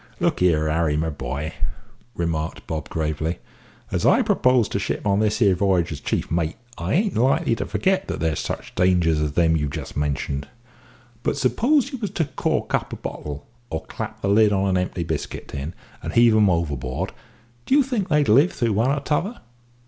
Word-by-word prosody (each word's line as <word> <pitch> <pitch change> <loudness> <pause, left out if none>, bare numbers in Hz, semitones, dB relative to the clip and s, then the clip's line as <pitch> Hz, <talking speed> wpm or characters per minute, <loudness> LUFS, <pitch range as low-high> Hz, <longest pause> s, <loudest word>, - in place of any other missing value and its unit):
"Look - - +1
here, 80 -4 +3
Harry, 75 -1 +1
my 80 +1 0
boy," 70 +3 -4 0.6
remarked 80 -2 -2
Bob 80 -1 -4
gravely, 80 +1 -2 0.5
"as - - -1
I - - +5
propose 125 -3 +3
to 100 - -1
ship - - -3
on 100 -1 +3
this 105 0 +2
here 100 -6 +4
v'y'ge 90 -3 +1
as 75 - -5
chief - - -2
mate, 80 -1 0 0.2
I 85 +4 -2
ain't 200 +2 +1
likely 120 0 +2
to - - -3
forget 190 0 +1
that - - -3
there's 80 -2 0
such - - -5
dangers 85 -4 +3
as 75 -1 -1
them 80 0 +3
you've 75 -2 0
just - - -6
mentioned; 70 -1 -2 0.7
But 135 - -1
suppose 250 - +2
you 265 - -5
was 210 -3 -2
to 160 - +2
cork - - -2
up - - 0
a - - -4
bottle, 75 -1 -6 0.2
or 80 - -3
clap - - -6
the - - +1
lid 105 +1 +5
on 100 -1 +1
an 95 - +2
empty 90 -1 -1
biscuit 80 -2 -4
tin, 70 +4 -5 0.3
and - - -5
heave 115 -1 +6
'em 105 -2 +5
overboard, 70 -7 -1 0.6
do 265 - +4
you 290 - +6
think 245 -7 -2
they'd 150 -2 +3
live 140 +12 +5
through 115 -4 0
one 115 +6 +2
or 140 +1 0
t'other? 170 +11 -1
90 Hz, 195 wpm, -23 LUFS, 80-125 Hz, 0.7 s, heave